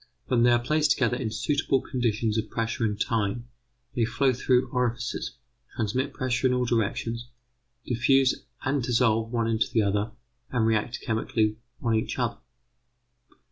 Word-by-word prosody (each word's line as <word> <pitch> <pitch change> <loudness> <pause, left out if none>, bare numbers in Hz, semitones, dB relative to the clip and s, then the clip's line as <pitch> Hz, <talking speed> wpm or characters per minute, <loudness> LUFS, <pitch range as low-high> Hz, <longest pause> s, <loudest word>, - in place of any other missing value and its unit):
When 120 -2 +2
they 120 - +6
are 120 - +5
placed 150 +6 +2
in 125 -1 +1
suitable 140 +3 +1
conditions 115 -4 -1
of 110 -1 -1
pressure 115 +1 -2
and 105 -1 -1
time, 115 +2 0 0.5
they 120 - +2
flow 130 +3 +2
through 125 +1 +2
orifices, 120 -2 -2 0.4
transmit 125 +6 -1
pressure 130 -1 0
in 125 - +2
all 125 0 +1
directions, 115 +1 -1 0.6
diffuse 130 +2 +3 0.2
and 140 0 +1
dissolve 115 -2 +2
one 115 -2 0
into 115 0 +1
the 110 - +3
other, 100 +2 0 0.4
and 120 -3 +1
react 110 +2 0
chemically 110 -1 0 0.3
on 115 -2 +2
each 110 - -1
other. 120 -2 -1
120 Hz, 145 wpm, -27 LUFS, 110-125 Hz, 0.6 s, they